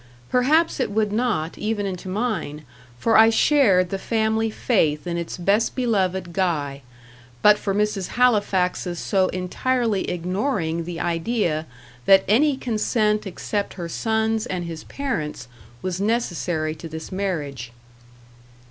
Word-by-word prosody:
Perhaps 295 +7 +3
it 255 - 0
would 210 0 0
not, 215 -9 -1
even 210 -1 -1
into 185 -1 -5
mine, 185 -8 -3 0.3
for 225 - +3
I 225 +1 +8
shared 220 -8 +4
the 195 - -2
family 220 +1 0
faith 160 - +1
in 175 -1 -2
its 170 0 -4
best 200 +5 +1
beloved 190 -8 0
Guy; 150 -7 -1 0.6
but 210 0 +6
for 195 -1 -2
Mrs. 210 -2 0
Halifax's 195 -7 +2
so 190 +1 +1
entirely 210 +4 -1
ignoring 180 - -1
the 175 -1 -5
idea 170 -2 -1 0.4
that 190 0 +7
any 270 +7 +3
consent 215 -3 0
except 200 +2 -3
her 175 -3 -5
son's 220 +4 0
and 180 -1 -3
his 165 -2 -7
parents' 195 - -4 0.4
was 185 0 -2
necessary 175 -8 -1
to 160 +1 -9
this 160 0 -7
marriage. 150 -11 -3
195 Hz, 130 wpm, -23 LUFS, 170-220 Hz, 0.6 s, I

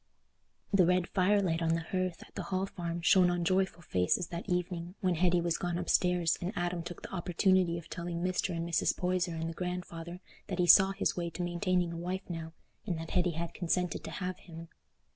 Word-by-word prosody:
The 185 -3 +5
red 180 -1 +2
fire 200 +2 +3
light 165 -2 0
on 165 0 +2
the 165 - -1
hearth 185 0 -2
at - - -25
the - - -4
Hall 190 0 0
Farm 170 -3 -5
shone 180 +1 +5
on 175 -1 0
joyful 190 -1 +1
faces 95 - +1
that 170 +3 -6
evening, 180 0 -2
when 185 -4 +1
Hetty 175 +1 +3
was 170 -1 0
gone 175 -2 -1
upstairs 180 -1 +2
and 180 +2 -2
Adam 175 -1 -1
took 175 0 -8
the - - -8
opportunity 180 0 +2
of 170 - -9
telling 170 0 -4
Mr. 185 -1 0
and 165 0 -3
Mrs. 165 -2 +1
Poyser 180 -2 0
and 160 0 -3
the 165 - -4
grandfather 180 -1 -5 0.3
that 185 - -3
he 180 - +3
saw 190 +3 +8
his 195 - 0
way 170 -1 -2
to 175 - -4
maintaining 175 0 0
a - - -5
wife 180 +2 -4
now, 165 -2 -5 0.4
and 175 -4 -1
that 165 0 -7
Hetty 180 -1 +2
had 170 +1 -4
consented 180 -1 -1
to - - -5
have 185 0 -4
him. 165 -1 -11
175 Hz, 215 wpm, -31 LUFS, 170-185 Hz, 0.4 s, saw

